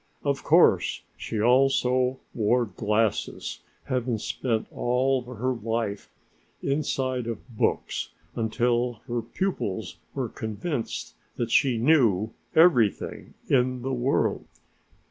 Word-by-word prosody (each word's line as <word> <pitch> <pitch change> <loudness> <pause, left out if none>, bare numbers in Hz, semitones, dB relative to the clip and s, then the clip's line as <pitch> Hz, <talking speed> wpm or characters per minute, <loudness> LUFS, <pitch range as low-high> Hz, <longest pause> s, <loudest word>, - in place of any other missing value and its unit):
Of - - -1
course - - +4
she 110 - -4
also 125 +1 +3 0.2
wore 120 +2 +2
glasses, 105 0 -1 0.2
having 125 -2 -1
spent 115 +1 -2
all 130 +2 +1
her 125 +1 -2
life 115 -3 -3 0.5
inside 130 -3 -1
of 115 0 -5
books - - 0 0.3
until 120 +2 +1
her 120 0 -1
pupils 115 - -3 0.2
were - - -1
convinced 110 - -4 0.2
that 120 -1 -2
she 130 -2 +4
knew 115 - +3 0.2
everything 155 - +3
in 125 -1 +2
the 135 +1 -2
world. 125 +2 +1
120 Hz, 105 wpm, -26 LUFS, 110-130 Hz, 0.5 s, course